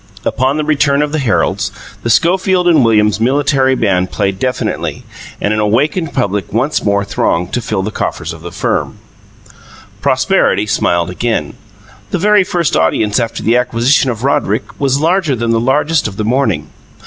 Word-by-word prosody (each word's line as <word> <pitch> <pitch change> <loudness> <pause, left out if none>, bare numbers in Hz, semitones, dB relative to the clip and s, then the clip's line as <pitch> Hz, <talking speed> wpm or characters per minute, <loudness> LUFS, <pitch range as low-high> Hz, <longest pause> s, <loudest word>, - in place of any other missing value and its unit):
Upon 130 +3 0
the 155 - -1
return 150 -1 +2
of 150 - -3
the 155 - -1
heralds, 125 -6 0 0.3
the 120 - -3
Schofield 180 - +2
and 160 -6 +5
Williams 105 -2 +2
Military 135 +2 +2
Band 95 -6 0
played 100 -2 -2
deafeningly, 125 +2 -2 0.4
and 105 - 0
an 110 - -1
awakened 145 - 0
public 105 -6 -2
once 130 +8 0
more 100 -1 +1
thronged 90 -3 -1
to 125 - 0
fill 105 -3 -2
the 105 - -3
coffers - - -4
of - - -12
the - - -8
firm. - - -2 1.0
Prosperity 105 - +2
smiled 85 -4 0
again. 90 -7 -2 0.6
The - - -1
very 210 +2 +4
first 175 -4 -1
audience 100 +7 +1
after 115 -1 -3
the 115 - +2
acquisition 125 +3 +2
of 115 -1 -4
Roderick 140 - +1 0.2
was 140 -1 +1
larger 165 -2 +1
than 115 -1 -1
the 115 - +2
largest 145 +5 +1
of 100 -2 -8
the 110 - -2
morning. 130 +5 0
125 Hz, 170 wpm, -14 LUFS, 105-145 Hz, 1.0 s, and